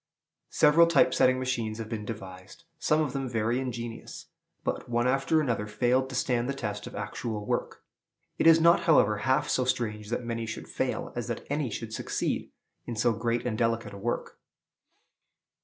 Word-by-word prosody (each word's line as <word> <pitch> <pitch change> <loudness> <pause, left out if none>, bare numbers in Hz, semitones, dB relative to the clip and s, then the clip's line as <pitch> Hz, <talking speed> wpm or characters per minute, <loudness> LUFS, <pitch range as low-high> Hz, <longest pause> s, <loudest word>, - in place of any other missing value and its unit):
Several 160 +3 +5
type 140 -5 +4
setting 130 0 +4
machines 120 -4 -2
have 110 -2 -5
been 110 -2 -5
devised, 95 - -9 0.2
some 155 +1 +2
of 145 -5 -1
them 135 -2 -2
very 115 +1 0
ingenious; 120 -3 -6 0.3
but - - -3
one 120 0 +1
after 135 +4 +2
another 115 -8 -1
failed 125 +4 +1
to 130 - -6
stand 125 -1 0
the 140 - -1
test 105 -5 -4
of - - -9
actual 105 +1 -4
work. - - -3 0.6
It - - +4
is 165 0 +8
not, 170 +1 +5
however, 105 -9 +5
half 130 +5 +1
so 130 - +1
strange 110 -4 -2
that 120 +1 -2
many 115 -1 -3
should 110 - -6
fail - - -3
as - - -3
that - - -4
any 145 -3 0
should 110 +1 -6
succeed - - -2 0.4
in 120 - -4
so 120 +2 +2
great 115 +1 -1
and 120 -3 -1
delicate 115 -1 0
a - - -8
work. 120 +4 -3
120 Hz, 180 wpm, -28 LUFS, 110-130 Hz, 0.6 s, is